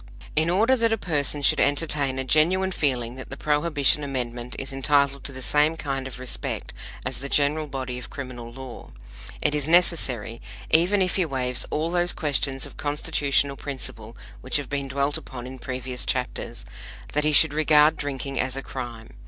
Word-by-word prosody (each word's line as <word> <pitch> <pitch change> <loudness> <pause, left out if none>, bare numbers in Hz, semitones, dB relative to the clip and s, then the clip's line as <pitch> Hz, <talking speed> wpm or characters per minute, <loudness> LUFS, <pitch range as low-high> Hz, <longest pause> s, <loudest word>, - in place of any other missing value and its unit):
In 160 +2 +3
order 220 +9 +4
that 230 -1 +2
a 225 - +2
person 145 -6 0
should - - +4
entertain 145 -2 +2
a 130 - 0
genuine 170 +8 +3
feeling 125 -7 -1
that 130 - -7
the 135 - -6
Prohibition 150 -1 +2
Amendment 125 -3 -4
is 135 0 -4
entitled 140 0 +2
to - - -5
the 130 -1 -7
same 150 +4 +3
kind 135 -3 -3
of 130 - -8
respect 130 -1 -4 0.3
as - - -3
the 140 - -5
general 150 +2 +2
body 130 -3 -4
of 125 - -9
criminal 125 -4 -7
law, 130 0 -9 0.5
it 150 - +2
is 150 -1 0
necessary 135 -10 +2 0.3
even 185 +5 +4
if 185 - 0
he 185 - +2
waives 125 -4 -1
all 160 +2 -1
those 175 0 +3
questions 140 -4 0
of - - -12
Constitutional 145 -1 0
principle 120 -5 -6 0.2
which 130 - +1
have 145 -3 -5
been 140 -1 -2
dwelt 140 +3 0
upon 130 -5 -9
in 130 +1 -8
previous 125 -1 -4
chapters 125 -1 -3 0.5
that 150 - +1
he 155 - +3
should 150 0 +7
regard 155 0 +5
drinking 140 -2 -4
as 130 0 0
a 135 - -4
crime. 120 -3 -7
140 Hz, 180 wpm, -25 LUFS, 130-155 Hz, 0.5 s, should